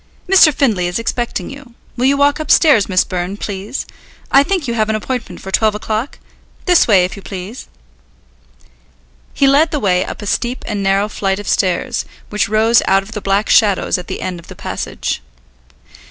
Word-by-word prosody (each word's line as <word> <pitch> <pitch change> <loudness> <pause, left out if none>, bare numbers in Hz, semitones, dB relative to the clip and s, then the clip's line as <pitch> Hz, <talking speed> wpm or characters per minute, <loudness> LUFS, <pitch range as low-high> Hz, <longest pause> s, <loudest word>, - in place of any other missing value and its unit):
"Mr. 360 -4 +6
Findlay 220 -11 +1
is 175 - -2
expecting 230 -3 -3
you. 275 -4 -13 0.2
Will 245 +1 0
you 280 +1 +3
walk 285 +1 +2
upstairs, 300 - +4
Miss 185 -1 +3
Byrne, 185 +2 -4
please. 205 +4 -5 0.5
I 275 - +7
think 340 -1 -1
you 235 - -1
have 215 -2 0
an 220 - +1
appointment 240 +2 -5
for 195 - -7
twelve 215 +1 +2
o'clock? 220 +4 -3 0.5
This 355 -2 +4
way, 190 -5 +5
if 180 - -6
you 200 - -10
please." 195 +5 -8 1.7
He 275 - +3
led 285 +4 +4
the 300 - -2
way 185 -5 +1
up - - -7
a - - -6
steep 240 +5 -2
and 205 -2 -2
narrow 195 +1 +1
flight 195 -2 -2
of 205 -1 -8
stairs, 185 -3 0 0.3
which 210 -1 0
rose 220 +2 +4
out 195 +1 +3
of 205 - -13
the 210 -2 -5
black 195 +2 0
shadows 200 -4 +3
at 180 - -9
the - - -5
end 180 -2 -4
of 170 - -16
the - - -11
passage. - - -4
215 Hz, 190 wpm, -16 LUFS, 195-260 Hz, 1.7 s, I